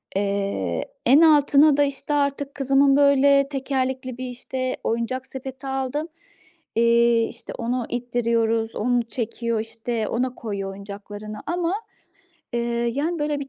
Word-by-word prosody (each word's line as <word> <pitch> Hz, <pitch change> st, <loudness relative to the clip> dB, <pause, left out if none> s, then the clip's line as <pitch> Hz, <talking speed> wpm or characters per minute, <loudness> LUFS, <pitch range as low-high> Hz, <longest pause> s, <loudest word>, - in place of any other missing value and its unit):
Eee, 195 Hz, -, -1 dB, 0.2 s
en 270 Hz, +6 st, +7 dB
altına 295 Hz, -2 st, +6 dB
da, 290 Hz, -, +5 dB
işte, 280 Hz, +1 st, -3 dB
artık 280 Hz, -1 st, -1 dB
kızımın, 275 Hz, 0 st, +4 dB
böyle, 280 Hz, -1 st, +5 dB
tekerlekli 260 Hz, -2 st, -2 dB
bir, 255 Hz, 0 st, -4 dB
işte, 255 Hz, +1 st, -4 dB
oyuncak 235 Hz, +3 st, -2 dB
sepeti 265 Hz, +1 st, -8 dB
aldım. 270 Hz, +3 st, -2 dB, 0.7 s
Eee, 235 Hz, 0 st, +4 dB
işte, -, -, -10 dB
onu 240 Hz, +1 st, -1 dB
ittiriyoruz, 230 Hz, -2 st, 0 dB
onu 245 Hz, +1 st, +1 dB
çekiyor, 230 Hz, 0 st, -3 dB
işte, 225 Hz, 0 st, -3 dB
ona 250 Hz, +1 st, -1 dB
koyuyor 200 Hz, -4 st, -4 dB
oyuncaklarını 205 Hz, +2 st, -8 dB
ama, 345 Hz, +1 st, 0 dB, 0.8 s
eee, 240 Hz, -, 0 dB, 0.3 s
yani, 320 Hz, +5 st, -1 dB
böyle, 295 Hz, -1 st, -1 dB
bir 275 Hz, -, -6 dB
255 Hz, 130 wpm, -23 LUFS, 230-275 Hz, 0.8 s, en